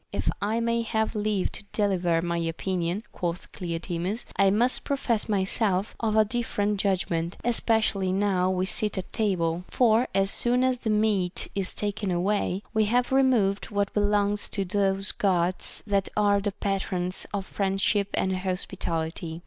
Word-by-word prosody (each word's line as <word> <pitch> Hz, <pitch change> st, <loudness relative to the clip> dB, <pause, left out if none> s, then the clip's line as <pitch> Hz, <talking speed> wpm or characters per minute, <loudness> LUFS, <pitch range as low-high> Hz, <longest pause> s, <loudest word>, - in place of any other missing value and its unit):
If -, -, -1 dB
I 215 Hz, +3 st, 0 dB
may 235 Hz, 0 st, +1 dB
have 220 Hz, -1 st, -1 dB
leave 210 Hz, -2 st, 0 dB
to -, -, -7 dB
deliver 180 Hz, -5 st, +1 dB
my 170 Hz, -1 st, -1 dB
opinion, 175 Hz, +3 st, -2 dB
quoth 175 Hz, 0 st, -4 dB
Cleoclemus, 175 Hz, +4 st, -3 dB
I 195 Hz, 0 st, +4 dB
must 235 Hz, +6 st, +2 dB
profess 240 Hz, -6 st, -1 dB
myself 200 Hz, 0 st, +1 dB
of 220 Hz, -2 st, 0 dB
a 215 Hz, 0 st, +5 dB
different 210 Hz, -3 st, -1 dB
judgment, 180 Hz, -3 st, 0 dB
especially 220 Hz, -5 st, +2 dB
now 190 Hz, -1 st, +1 dB
we 185 Hz, 0 st, 0 dB
sit 210 Hz, +1 st, +1 dB
at 190 Hz, -, -5 dB
table; 180 Hz, -6 st, 0 dB
for 235 Hz, 0 st, +3 dB
as 195 Hz, 0 st, +3 dB
soon 245 Hz, +1 st, +2 dB
as 255 Hz, -1 st, +1 dB
the 230 Hz, -, -3 dB
meat 210 Hz, -4 st, +1 dB
is 195 Hz, -1 st, -1 dB
taken 205 Hz, -1 st, -2 dB
away, 190 Hz, +2 st, 0 dB
we 220 Hz, -1 st, +3 dB
have 245 Hz, +4 st, +1 dB
removed 245 Hz, -8 st, +2 dB
what 200 Hz, -1 st, -1 dB
belongs 205 Hz, 0 st, +1 dB
to 195 Hz, -2 st, -2 dB
those 195 Hz, 0 st, +1 dB
Gods 180 Hz, -2 st, 0 dB
that 200 Hz, -2 st, 0 dB
are 205 Hz, -1 st, +4 dB
the 205 Hz, 0 st, -1 dB
patrons 190 Hz, -2 st, -2 dB
of 200 Hz, -2 st, -3 dB
friendship 195 Hz, +1 st, 0 dB
and 190 Hz, 0 st, 0 dB
hospitality. 170 Hz, -3 st, -3 dB
200 Hz, 155 wpm, -26 LUFS, 185-215 Hz, -, a